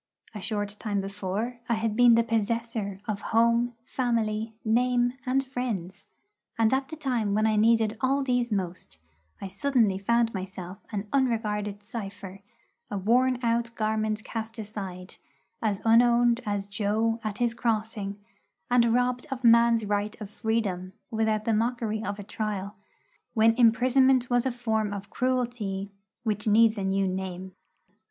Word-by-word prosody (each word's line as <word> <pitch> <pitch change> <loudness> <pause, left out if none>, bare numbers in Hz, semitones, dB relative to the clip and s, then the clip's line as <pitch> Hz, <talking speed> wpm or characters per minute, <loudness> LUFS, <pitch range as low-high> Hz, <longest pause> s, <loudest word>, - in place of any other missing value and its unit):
A 210 - -7
short 205 +1 -3
time 205 -3 -1
before, 200 +5 -3
I 235 - +3
had 220 -1 -1
been 240 0 +7
the 230 - +4
possessor 230 -2 -2
of 210 -2 -2
home, 235 +1 +2
family, 225 -4 -1
name, 245 +2 +2
and 270 +2 +1
friends; 220 -9 -4 0.5
and 225 +1 +3
at 265 0 +1
the 315 - -6
time 245 -9 -1
when 215 +1 +2
I 220 -1 +2
needed 220 0 +3
all 275 +2 +2
these 245 -2 0
most, 180 - -4 0.4
I 195 - -5
suddenly 215 -1 +1
found 235 +3 +2
myself 190 0 -7
an 210 -1 -3
unregarded 210 -6 0
cipher, 200 -3 -7 0.5
a 205 - -3
worn 250 +6 +3
out 235 0 +1
garment 215 0 -1
cast 225 0 -6
aside, 195 -4 -7 0.4
as 210 -3 -1
unowned 235 +1 +5
as 205 -1 -1
'Jo' 215 +3 0
at 215 -2 -3
his 240 -1 +1
crossing, 215 -3 -2 0.5
and 235 -2 +4
robbed 250 +2 0
of 265 -2 -5
man's 235 -1 +5
right 205 +2 -2
of 210 -2 -8
freedom 205 -5 -2 0.2
without 220 -1 0
the 230 - +2
mockery 225 -1 -1
of 200 +1 -3
a 205 - -7
trial, 205 -1 -4 0.6
when 225 0 +5
imprisonment 250 +2 +4
was 245 +1 +3
a - - 0
form 220 -4 -1
of 200 0 -7
cruelty 240 -6 -1 0.3
which 215 -1 -2
needs 220 +1 +5
a - - -2
new 195 0 +1
name. 185 0 -4
220 Hz, 150 wpm, -27 LUFS, 205-240 Hz, 0.6 s, been